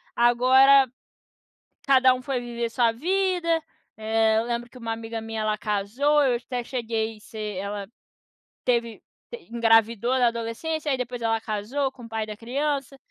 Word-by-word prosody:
Agora 260 +3 +6 1.0
cada 260 -1 +6
um 255 - -6
foi 255 -1 -2
viver 235 -1 -3
sua 230 -1 +2
vida. 345 +2 0 0.4
Eh, 220 0 +2
eu 225 - 0
lembro 240 0 -3
que - - -17
uma 230 -1 -4
amiga 225 0 -5
minha 225 -1 -4
ela 215 0 0
casou, 220 +9 +1
eu 250 -2 +2
até 245 +1 -4
cheguei 225 -3 -3
ser 210 -2 -6
ela 200 0 -5 0.8
teve, 235 -2 0 0.3
te 475 - -7
engravidou 230 +1 +3
na 245 - +5
adolescência, 235 +7 -3
aí 265 - +2
depois 245 -1 -5
ela 225 -1 0
casou 225 +6 -2
com 255 -2 -14
o 230 - -12
pai 220 -1 -2
da 210 -1 -7
criança. 275 +3 -2
235 Hz, 160 wpm, -25 LUFS, 225-265 Hz, 1.0 s, Agora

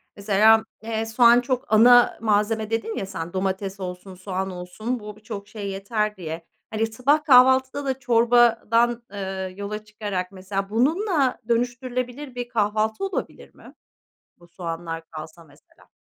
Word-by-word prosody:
mesela, 215 +2 +4 0.2
eee, 220 0 -3
soğan 235 +2 +5
çok 250 -2 -3
ana 245 +2 +6
malzeme 215 0 +1
dedin 225 0 -2
ya, - - -2
sen, 170 -3 -6
domates 190 +1 -2
olsun, 185 0 -7
soğan 190 +1 -4
olsun 185 +7 -5
bu 210 -1 -9
birçok 210 -2 -8
şey 210 -2 -6
yeter 210 +2 -2
diye, 165 -1 -6 0.2
hani, 220 +1 -1
sabah 260 +7 +1
kahvaltıda 260 0 +5
da 265 -1 -2
çorbadan, 235 -1 +3
eee, 190 -2 -5
yola 210 +1 -5
çıkarak, 205 -3 -4
mesela, 195 +1 -4
bununla 285 - +1
dönüştürülebilir 245 +2 -2
bir 245 -1 -5
kahvaltı 220 - 0
olabilir 390 - -5
mi? - - -15 0.7
Bu 175 - -18
soğanlar 165 -1 -6
kalsa 160 +1 -9
mesela. 145 -2 -24
215 Hz, 140 wpm, -23 LUFS, 195-245 Hz, 0.7 s, ana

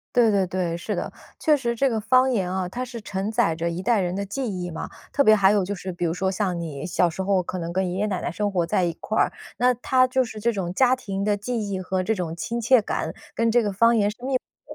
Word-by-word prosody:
对 235 -2 +5
对 195 -2 +2
对， 180 -2 -2
是 175 - -4
的。 - - -3 0.3
确 305 -1 +4
实 240 -4 -1
这 275 +4 +2
个 230 -3 -1
方 255 +4 +3
言 190 -7 0
啊， 185 -1 -1
它 245 +7 -4
是 240 -2 -8
承 200 0 -3
载 215 -8 +2
着 170 +1 -1
一 170 +2 -4
代 235 +1 +2
人 175 0 -2
的 200 +1 -3
记 260 +7 -3 0.2
忆 175 0 -4
嘛， 160 - -6 0.2
特 280 - +2
别 215 - +7
还 195 -2 +5
有 205 -2 +2
就 200 +3 -3
是 190 0 -6
比 175 0 -4
如 165 - +1
说 190 +2 -1
像 190 -3 -1
你 150 -4 -5
小 180 0 +2
时 170 +3 -4
候 190 -1 +2
可 180 - -5
能 170 -1 -4
跟 185 0 0
爷 180 - -3
爷 210 - +1
奶 190 -4 -2
奶 - - -2
生 205 +3 -2
活 175 -3 +1
在 180 +2 +1
一 170 - 0
块 220 - -2
儿， - - +3 0.2
那 250 +1 +4
它 255 +1 +2
就 260 +1 +1
是 225 -3 -6
这 235 +3 +1
种 185 -5 -3
家 255 +3 +4
庭 200 -6 -4
的 210 0 +2
记 225 0 -3
忆 190 -1 -2
和 185 0 -1
这 220 +4 0
种 170 -4 -4
亲 235 +7 -3
切 235 0 +5
感， - - -3 0.2
跟 230 0 +2
这 240 +1 +4
个 205 -2 -1
方 230 +4 +4
言 205 -2 +2
是 210 - -11
密 265 +1 0
不 - - -9
200 Hz, 310 characters per minute, -24 LUFS, 180-235 Hz, 0.3 s, 别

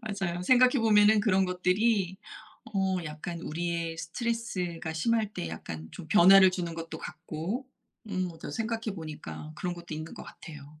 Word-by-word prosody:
맞아요. 195 -6 -3
생각해 255 +4 +5
보면은 215 -1 +5
그런 195 -2 +3
것들이 185 +1 +1 0.6
어 190 -1 +1
약간 160 +2 -6
우리의 170 0 -3
스트레스가 180 -5 -3
심할 215 +5 0
때 85 - -4
약간 80 0 -7
좀 165 - -9
변화를 190 0 +8
주는 175 -2 -3
것도 165 -1 -6
같고. 180 - -5 0.4
음 185 -2 -1
뭐 165 - -11
더 - - -7
생각해 225 +3 -3
보니까 155 -1 -7
그런 180 +1 -3
것도 170 -1 -10
있는 155 +1 -7
것 - - -9
같아요. 150 -1 -12
180 Hz, 330 characters per minute, -29 LUFS, 165-210 Hz, 0.6 s, 변화를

